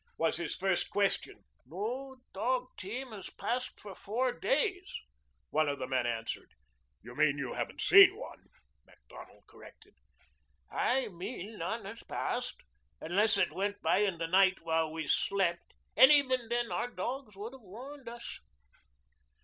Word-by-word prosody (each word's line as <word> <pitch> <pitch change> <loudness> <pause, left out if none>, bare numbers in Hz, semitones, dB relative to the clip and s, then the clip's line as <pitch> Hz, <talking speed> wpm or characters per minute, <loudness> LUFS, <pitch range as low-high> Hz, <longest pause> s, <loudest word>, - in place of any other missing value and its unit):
was 165 - +1
his 170 -2 -3
first 190 -1 0
question. 200 -1 0 0.2
"No 235 - -5 0.2
dog 250 +5 0
team 240 +7 -6
has 205 -3 -8
passed 250 +2 -3
for 205 -2 -8
four 240 +7 -1
days," 380 -7 0 0.6
one 155 -1 +2
of 140 - -2
the 130 - -3
men 130 -2 0
answered. 115 -1 -4 0.5
"You - - -11
mean - - +3
you - - -3
haven't - - -4
seen - - +8
one," - - -10 0.4
Macdonald - - -15
corrected. - - -16 0.8
"I 260 -1 +1
mean 200 +3 -7
none 205 +6 -3
has 215 +4 -8
passed - - -3 0.4
unless 205 +5 +2
it - - +2
went 200 +1 -2
by - - +3
in 200 -4 +1
the 165 - -2
night 190 +2 +4
while 160 -1 +1
we 160 0 -4
slept. 175 +2 +1 0.2
And 265 - +9
even 260 -5 +3
then 240 0 0
our - - -1
dogs 245 +2 -5
would 215 +5 -7
have 265 - -12
warned 245 +6 -10
us." 235 0 -6
205 Hz, 150 wpm, -32 LUFS, 175-250 Hz, 0.8 s, And